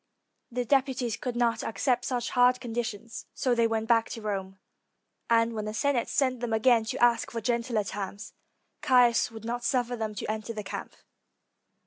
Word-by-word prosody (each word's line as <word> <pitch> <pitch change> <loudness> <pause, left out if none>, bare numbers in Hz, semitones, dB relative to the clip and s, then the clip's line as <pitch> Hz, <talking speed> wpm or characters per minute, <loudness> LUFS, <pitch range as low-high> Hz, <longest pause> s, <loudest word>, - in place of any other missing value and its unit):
The 245 +1 -2
deputies 260 -3 +1
could 245 +1 -4
not 235 -1 +1
accept 245 +3 0
such 245 -2 -2
hard 250 0 +4
conditions, 235 -2 -5
so 255 - +1
they 235 -1 +3
went 225 -1 -2
back 230 -1 +3
to 225 - -6
Rome. 195 -2 -3 0.7
And 230 0 +3
when 215 -1 -3
the 215 0 -4
Senate 280 -2 +1
sent 255 -3 +1
them 235 -2 -2
again 225 0 +4
to - - -3
ask 240 -1 +3
for 230 - -4
gentler 235 -1 0
terms, 200 +1 -6 0.5
Caius 250 -5 +4
would 225 -1 -10
not 240 +1 -3
suffer 245 -1 0
them 220 -2 -4
to - - -4
enter 220 +1 -4
the 210 -1 -5
camp. - - -6
235 Hz, 175 wpm, -28 LUFS, 220-245 Hz, 0.7 s, hard